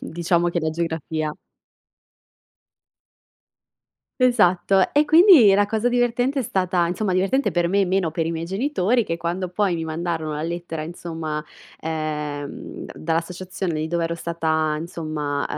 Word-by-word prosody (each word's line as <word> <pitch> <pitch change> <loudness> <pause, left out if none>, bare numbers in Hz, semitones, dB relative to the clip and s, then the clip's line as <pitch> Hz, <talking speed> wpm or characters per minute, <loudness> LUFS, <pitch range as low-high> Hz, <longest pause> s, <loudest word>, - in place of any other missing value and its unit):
diciamo 170 +1 0
che 170 - -1
la 160 0 -1
geografia 160 -2 -3 2.9
Esatto. 195 -6 +3
E 295 +1 +4
quindi 315 - +7
la 205 0 +3
cosa 220 +3 0
divertente 245 +3 +1
è - - +1
stata 185 -4 0
insomma 185 +2 -1
divertente 195 +10 +1
per 175 -1 +1
me, 195 +2 +2
meno 180 -3 0
per 165 -1 -1
i - - -1
miei 165 0 -3
genitori, 235 - +1
che 165 - -2
quando 175 +2 -3
poi 185 0 0
mi 165 -1 -3
mandarono 160 -1 -3
la 150 - -3
lettera 170 -2 -4
insomma, 160 -2 -5 0.4
ehm, 150 -2 -4
da - - -9
dall'associazione 175 +2 -3
di 155 +1 -2
dove 170 0 0
ero 170 - -2
stata 160 -2 -1
insomma, 155 -3 -3
170 Hz, 145 wpm, -22 LUFS, 160-195 Hz, 2.9 s, quindi